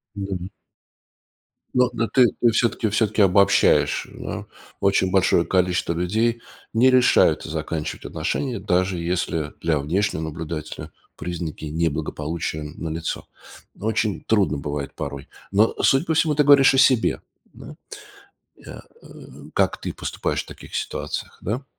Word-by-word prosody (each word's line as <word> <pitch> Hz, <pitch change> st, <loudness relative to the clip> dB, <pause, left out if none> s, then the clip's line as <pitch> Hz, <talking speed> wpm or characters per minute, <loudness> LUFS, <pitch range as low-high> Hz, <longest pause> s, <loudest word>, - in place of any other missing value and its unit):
Мгм. 95 Hz, -3 st, -4 dB, 1.3 s
Но 125 Hz, -1 st, +3 dB
но 115 Hz, -1 st, -1 dB
ты 125 Hz, -3 st, +5 dB
ты 120 Hz, -, +5 dB
всё-таки 115 Hz, -1 st, +1 dB
всё-таки 110 Hz, 0 st, +1 dB
обобщаешь, 100 Hz, +1 st, +4 dB
да. -, -, -6 dB, 0.3 s
Очень 95 Hz, -1 st, +2 dB
большое 95 Hz, -2 st, +3 dB
количество 90 Hz, -2 st, +1 dB
людей 110 Hz, +7 st, 0 dB, 0.3 s
не 125 Hz, +3 st, +5 dB
решаются 125 Hz, -9 st, +4 dB
заканчивать 80 Hz, 0 st, -4 dB
отношения, 125 Hz, -6 st, -2 dB
даже 95 Hz, -1 st, 0 dB
если 85 Hz, -3 st, -2 dB
для 80 Hz, -3 st, +1 dB
внешнего 85 Hz, +5 st, -1 dB
наблюдателя 80 Hz, 0 st, -6 dB, 0.3 s
признаки 85 Hz, -3 st, -5 dB
неблагополучия 80 Hz, 0 st, -2 dB
налицо. 80 Hz, +1 st, -5 dB, 0.5 s
Очень 110 Hz, -1 st, -1 dB
трудно 100 Hz, -9 st, +2 dB
бывает 70 Hz, 0 st, -4 dB
порой. 70 Hz, -1 st, -6 dB, 0.2 s
Но, 105 Hz, +3 st, +3 dB
судя 135 Hz, +6 st, +3 dB
по 160 Hz, -, 0 dB
всему, 155 Hz, -1 st, +2 dB
ты 150 Hz, -, +4 dB
говоришь 140 Hz, -2 st, +7 dB
о -, -, +2 dB
себе. 130 Hz, -3 st, +3 dB, 0.3 s
Да? -, -, -11 dB, 0.9 s
Э, -, -, -9 dB, 0.2 s
э, -, -, -15 dB, 0.5 s
как -, -, +1 dB
ты -, -, -4 dB
поступаешь -, -, -3 dB
в -, -, -24 dB
таких -, -, -12 dB
ситуациях, -, -, -4 dB
да? 120 Hz, +8 st, -3 dB
95 Hz, 130 wpm, -23 LUFS, 80-115 Hz, 1.3 s, говоришь